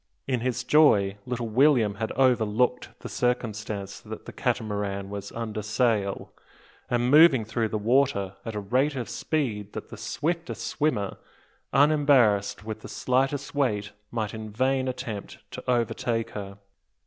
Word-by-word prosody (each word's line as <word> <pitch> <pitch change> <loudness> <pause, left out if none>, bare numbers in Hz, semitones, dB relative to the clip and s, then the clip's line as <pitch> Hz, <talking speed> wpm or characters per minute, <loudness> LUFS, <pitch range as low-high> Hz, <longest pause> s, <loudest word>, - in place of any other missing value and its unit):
In 130 -2 0
his 125 0 -1
joy 110 -9 +4
little 120 -2 -2
William 120 -2 +4
had 110 - -1
overlooked 125 -1 +2
the - - -6
circumstance 110 -5 -2
that - - -9
the - - -9
Catamaran 100 -2 -2
was 100 0 -6
under 110 -2 -4
sail, 105 -2 0 0.6
and 120 +1 +1
moving 150 -6 +7
through 110 +1 -1
the 110 - -1
water 110 -4 +1
at 115 -2 -5
a - - -1
rate 130 +8 +1
of 125 -3 -3
speed 110 -10 -2
that - - -7
the - - -9
swiftest 165 +2 -3
swimmer, 145 -10 -1 0.5
unembarrassed 135 -9 +3
with 110 -1 -5
the - - -9
slightest 135 +2 0
weight, 105 -8 0 0.2
might 110 -3 -3
in 110 -1 -6
vain 130 +4 +1
attempt 115 -5 -5
to - - -7
overtake 115 -1 0
her! 100 -1 -7
115 Hz, 145 wpm, -26 LUFS, 105-130 Hz, 0.6 s, moving